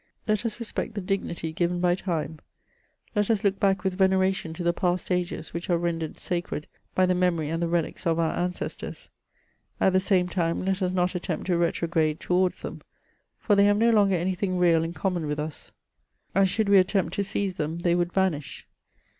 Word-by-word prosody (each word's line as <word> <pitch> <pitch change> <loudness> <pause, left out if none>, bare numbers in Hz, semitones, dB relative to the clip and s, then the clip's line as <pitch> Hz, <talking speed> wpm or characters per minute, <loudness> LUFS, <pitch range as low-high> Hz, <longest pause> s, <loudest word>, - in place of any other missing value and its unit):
Let 215 +2 +1
us 220 0 -6
respect 230 -1 -4
the - - -1
dignity 180 -4 -2
given 175 +1 0
by 175 0 +3
time; 165 -4 -3 0.8
let 210 0 +1
us 220 -3 +2
look 200 -1 +1
back 195 -2 +2
with 190 0 -2
veneration 190 -3 +2
to 175 - -5
the 170 0 +2
past 180 +1 -1
ages 175 -3 -2
which 170 +2 -5
are 175 - +3
ren 170 -1 -1
dered 160 -2 -5
sacred 175 -4 -3 0.3
by 185 - +4
the 185 - +2
memory 175 -4 +1
and 165 +1 -1
the 170 - +1
relics 170 +1 -1
of 165 -1 +2
our 165 -1 +1
ancestors; 180 0 -4 0.7
at 190 - +3
the 185 - +5
same 185 -1 +2
time 170 0 -1
let 190 +1 0
us 185 - +1
not 180 0 +1
attempt 180 - -3
to 180 - +1
retrograde 165 -2 +1
towards 180 0 +1
them, - - -6 0.6
for 205 - +2
they 200 0 +5
have 205 0 +4
no 230 +2 +4
longer 200 -3 +4
any 180 +2 0
thing 185 0 -1
real 170 -2 +4
in 165 +1 -4
common 175 -1 -1
with 150 0 -2
us, 150 0 -6 0.6
and 195 0 +4
should 220 +2 0
we 200 -1 +7
attempt 185 -2 +1
to 200 - 0
seize 200 -2 -2
them 155 +2 -2
they 170 0 +1
would 175 0 +1
vanish. 180 -7 -1
180 Hz, 205 wpm, -26 LUFS, 170-190 Hz, 0.8 s, we